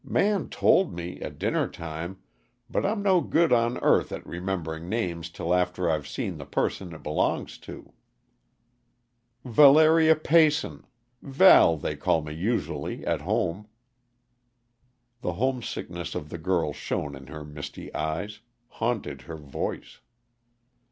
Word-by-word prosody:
"Man 205 -1 +1
told 185 - +3
me, 85 +1 -6
at - - -6
dinner - - 0
time, 85 +3 -7 0.5
but - - 0
I'm 205 0 -1
no 190 -3 +4
good 165 -4 +2
on 120 0 +2
earth - - +3
at - - -6
remembering 85 -2 -4
names 85 -7 -2
till 85 +1 -2
after 90 0 0
I've 75 -3 -2
seen - - -4
the - - -7
person 90 -3 -2
it - - -12
belongs 75 - -1
to." - - -11 1.5
"Valeria 155 +5 +6
Peyson 150 - +2 0.3
Val, 135 - +6
they - - -3
call 80 - +1
me 75 0 -6
usually, 105 +9 -3
at - - 0
home." 90 +5 -1 1.5
The 90 - -2
homesickness 110 -7 -3
of 75 - -5
the 85 - -7
girl 85 -3 0
shone 70 0 -4
in 65 -1 -12
her 75 +1 -8
misty 75 -1 -8
eyes, 80 +8 -3 0.3
haunted 110 - -3
her 80 - -5
voice. 70 -3 -5
90 Hz, 130 wpm, -26 LUFS, 80-130 Hz, 1.5 s, Valeria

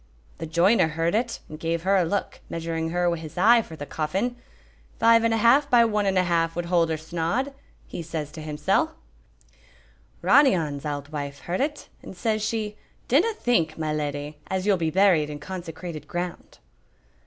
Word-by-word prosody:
"The 165 - -5
joiner 170 +4 +4
heard 165 +2 -1
it, 235 +2 -1
and 155 - -9
gave 165 0 -2
her 195 +2 +3
a 185 - +4
look, 200 +5 -2
measuring 165 -1 -3
her 175 +1 0
wi' 170 -1 +1
his 155 0 -10
eye 230 +6 +6
for 165 - -10
the 145 - -7
coffin. 190 +13 -2 0.6
'Five 230 0 +5
and 230 - +2
a 225 - +2
half 265 +6 +4
by 240 -3 +6
one 210 -2 0
and 190 -1 +1
a 185 - +4
half 165 -2 0
would 175 0 -2
hold 170 -1 +2
her 160 - -1
snod,' 170 - -2 0.3
he - - -7
says 160 -3 -5
to 160 - -9
himsel'." 155 - 0 1.3
"Ronny 280 -8 +6
On's 150 -3 -3
auld 145 -1 -4
wife 140 -2 -5
heard 175 +6 -2
it, 295 +1 -2
and 190 - -11
says 215 +2 0
she, 215 -1 -2 0.3
'Dinna 370 - +3
think, 170 - +1
my 155 -1 -2
leddy, 145 0 -4
as 190 0 -2
you'll 205 -1 +4
be 165 -3 -1
buried 175 -4 +3
in 150 - -5
consecrated 165 -2 -7
ground.'" 175 0 -5
170 Hz, 190 wpm, -25 LUFS, 160-210 Hz, 1.3 s, eye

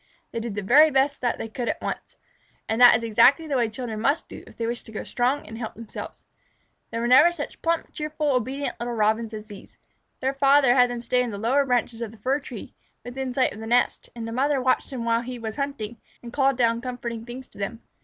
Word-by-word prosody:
they 230 - -3
did 225 -3 -5
the 210 - -3
very 290 +10 +7
best 275 0 +1
they 240 -2 -1
could 235 +2 -4
at - - -2
once. - - -5 0.5
And 225 +2 -1
that 245 -2 +9
is 230 - -7
exactly 235 +8 +5
the 290 -3 -2
way 235 -3 +2
children 225 -2 -5
must 280 +7 +1
do - - -10
if - - -16
they 230 - -2
wish 235 +1 -2
to - - -12
grow 215 - -5
strong 255 +4 0
and 225 +1 -9
help 220 -2 -5
themselves. 230 -1 -9 0.6
There 230 +1 -2
never 260 +7 +7
were - - +2
such 310 -4 -7
plump, 335 0 -1
cheerful, 305 0 -2
and 265 - +3
obedient 265 +4 -3
little 240 0 -3
Robins 220 +1 +1
as 215 -1 -7
these. 205 -2 -13 0.4
Their 265 +1 0
father 275 -2 +5
had 250 -1 +5
them 240 -1 -5
stay 250 +1 +2
in 245 - -1
the 205 - -5
lower 265 +7 +2
branches 240 -2 0
of 230 - -3
the 225 - -15
fir 260 +7 0
tree, 290 - -9 0.3
within 260 +1 -4
sight 255 +1 +1
of 210 - -10
the 225 - -7
nest, 245 +2 +1
and 230 -1 -5
the - - -5
mother 275 +4 +1
watched 255 0 +1
them 250 -4 -4
while 230 0 +2
he 250 +1 -6
was 220 0 -6
hunting, 260 -6 -4 0.2
and 235 0 -9
called 270 -2 +2
down 230 -2 +2
comforting 240 -2 -5
things 245 +2 -8
to - - -17
them. 225 +4 -4
245 Hz, 245 wpm, -25 LUFS, 230-270 Hz, 0.6 s, that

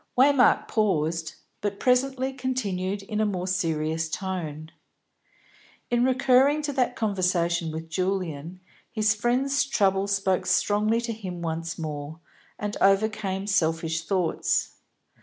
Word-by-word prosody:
Waymark 265 -1 +5
paused, 165 -6 0 0.3
but 205 -1 -3
presently 260 +1 +1
continued 205 -7 -2
in 210 +2 -2
a - - +3
more 185 -3 -2
serious 160 -3 -1
tone. 160 -3 -4 1.2
In 240 0 +3
recurring 260 +3 +3
to 290 -1 -2
that 250 -2 0
conversation 180 -5 0
with 160 +1 -6
Julian, 180 -1 -3 0.3
his 215 -1 +2
friend's 255 +6 +1
trouble 195 -7 +1
spoke 195 -2 0
strongly 215 +3 +2
to 235 -1 -3
him 185 -5 -7
once 165 0 -3
more, 150 0 -5 0.4
and 210 0 -4
overcame 195 -1 +2
selfish 165 -4 0
thoughts. 180 -2 0
195 Hz, 120 wpm, -26 LUFS, 165-235 Hz, 1.2 s, Waymark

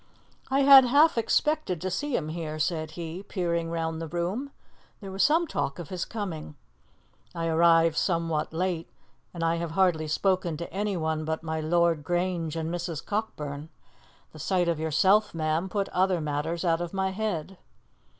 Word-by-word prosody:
"I 270 +1 +2
had 275 -1 +9
half 290 +6 +5
expected 235 - +1
to 185 - -2
see 290 +7 -2
him 155 -2 -2
here," 155 -1 -4
said 155 0 -1
he, 170 +2 -5
peering 170 -4 -2
round 165 -1 -3
the 165 - -4
room; 180 - -3 0.5
"there 195 -3 -8
was 195 +1 -2
some 325 +3 +4
talk 140 - -3
of 175 -4 -8
his 180 -2 -3
coming. 170 -9 -6 0.8
I 165 -1 -2
arrived 165 0 +4
somewhat 165 -4 0
late, 170 0 -2 0.4
and 170 -2 -5
I 165 0 +1
have 170 0 -3
hardly 175 -5 +2
spoken 180 0 0
to 170 - -7
anyone 170 -6 -1
but 160 +1 -3
my 160 -1 -2
Lord 170 -1 +2
Grange 175 -1 -1
and 165 +1 -3
Mrs. 170 -3 -4
Cockburn. 150 -8 -4 0.6
The - - -11
sight 180 -2 +1
of 170 -2 0
yourself, 190 +7 +3
ma'am, 160 +3 -1
put 200 +1 -1
other 185 -1 +1
matters 155 +3 -2
out 165 0 +2
of 175 +2 -5
my 190 0 0
head." 190 -3 -3
170 Hz, 170 wpm, -27 LUFS, 160-190 Hz, 0.8 s, had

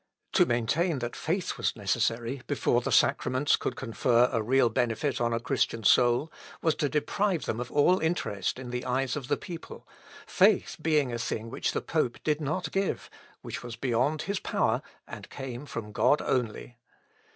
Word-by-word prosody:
To - - +5
maintain 140 +8 +1
that 120 -1 -4
faith 175 +3 -2
was - - 0
necessary 115 +4 -1
before - - +1
the - - -3
sacraments 130 +3 +3
could - - -3
confer 120 0 +2
a 115 - 0
real 130 +3 +3
benefit 120 +3 -1
on 120 0 +1
a 115 - 0
Christian 115 -2 -1
soul, 120 +8 +4 0.3
was 160 - +2
to 145 -3 0
deprive 175 +4 0
them 110 - -2
of 125 0 -5
all 180 +6 +4
interest 125 - -1
in 125 -1 -7
the 125 0 -3
eyes 130 0 0
of 140 -4 -5
the 145 0 +1
people; 170 -2 -9 0.4
faith - - +3
being 150 -6 +2
a 115 - -3
thing 115 0 -3
which - - -1
the - - -1
pope 155 -7 -1
did 150 0 0
not 155 +5 -2
give, 195 0 -2 0.3
which - - -5
was 120 -1 -7
beyond 130 +5 0
his 200 +1 -2
power, - - 0 0.3
and - - -9
came 135 +1 -7
from 110 -5 -6
God 145 +8 +3
only. 120 -1 -2
130 Hz, 175 wpm, -28 LUFS, 120-150 Hz, 0.4 s, To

